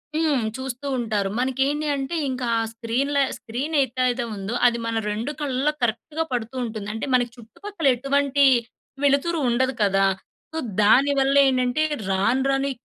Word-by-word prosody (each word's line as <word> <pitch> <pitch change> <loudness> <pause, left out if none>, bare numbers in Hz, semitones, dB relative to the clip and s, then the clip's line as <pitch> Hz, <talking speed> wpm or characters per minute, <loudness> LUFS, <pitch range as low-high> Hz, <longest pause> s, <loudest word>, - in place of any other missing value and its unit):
హ్మ్. 310 -5 +2 0.2
చూస్తూ 260 +1 -5
ఉంటారు. 215 -5 -1
మనకేంటి 270 +4 0
అంటే 275 +4 -3
ఇంకా 255 -1 -3
ఆ - - +1
స్క్రీన్‌లా 260 +5 0 0.2
స్క్రీన్ 255 +7 -4
ఏతైదో 255 0 -1
ఉందో 200 +3 -5
అది 235 0 +1
మన 230 - -2 0.2
2 225 +7 -3
కళ్ళలో 280 +1 0
కరెక్ట్‌గా 295 +8 -1
పడుతూ 235 +1 -3
ఉంటుంది. 215 -3 -6
అంటే 225 - -4
మనకి 245 -1 +1
చుట్టుపక్కలెటువంటి 280 - 0 0.6
వెలుతురు 285 +4 +2
ఉండదు 260 +2 +1
కదా! 195 -1 +3 0.5
సో, - - -4 0.2
దానివల్లేండంటే 270 +2 +4 0.3
రాను 200 +7 +2
రాను 270 0 +1
ఈ - - -20
260 Hz, 135 wpm, -23 LUFS, 235-280 Hz, 0.6 s, దానివల్లేండంటే